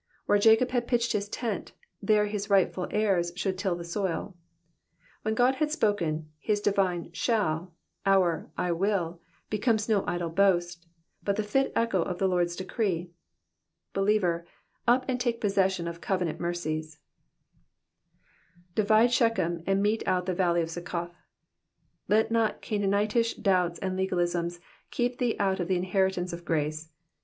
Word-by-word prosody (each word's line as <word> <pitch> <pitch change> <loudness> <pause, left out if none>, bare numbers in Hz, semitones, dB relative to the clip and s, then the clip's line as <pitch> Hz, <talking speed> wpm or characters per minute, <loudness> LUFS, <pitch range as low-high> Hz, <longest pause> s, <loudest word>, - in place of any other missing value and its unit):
Where 205 - +3
Jacob 225 +4 +5
had 245 -2 0
pitched 235 -1 +1
his 205 0 -2
tent, 225 -3 -4 0.3
there 210 +1 +3
his 205 0 -4
rightful 190 -2 +2
heirs 195 -5 +1
should 190 +1 -1
till 185 -2 -1
the 170 - -6
soil. 185 +1 -3 0.9
When 220 0 -1
God 250 +3 +4
has 300 +1 0
spoken, 170 - 0
his 205 +7 0
divine 190 -5 0
shall, 175 -6 0 0.3
our 185 -5 +2
*'/ - - -30
triZZ," 180 -1 0 0.3
becomes 215 0 +1
no 210 -4 +2
idle 175 -1 -2
boast, 175 -2 +1 0.3
but 200 - 0
the 215 - -1
fit 270 +6 +1
echo 230 -6 +2
of 180 +1 -3
the 190 - +2
Lord's 175 -2 +1
decree. 185 -3 -2 0.8
Believer, 195 -4 +1 0.4
up 250 +2 +4
and 255 -1 -1
take 240 -2 0
possession 190 -4 +1
of 170 0 -6
covenant 180 -5 -1
mercies, 155 -3 -3 1.8
^'Bivitle 220 +3 +4
Shechem, 185 -9 +1
and 195 +1 +2
met€ 215 +2 +1
out 180 -1 +1
the 185 - -1
valley 175 -2 +2
of 165 - -5
Suceoth.'''^ 175 0 -4 1.0
Let 220 +2 +3
not 225 -1 +1
Oanaanitish 210 +3 0
doubts 180 -4 +2
and 190 -1 -3
legalisms 175 -2 -1 0.3
keep 245 0 -1
thee 245 -2 +1
out 195 -1 +1
of 175 - -1
the 185 -1 +1
inheritance 185 -1 0
of 170 0 -7
grace. 155 -1 -2
190 Hz, 150 wpm, -28 LUFS, 175-215 Hz, 1.8 s, Jacob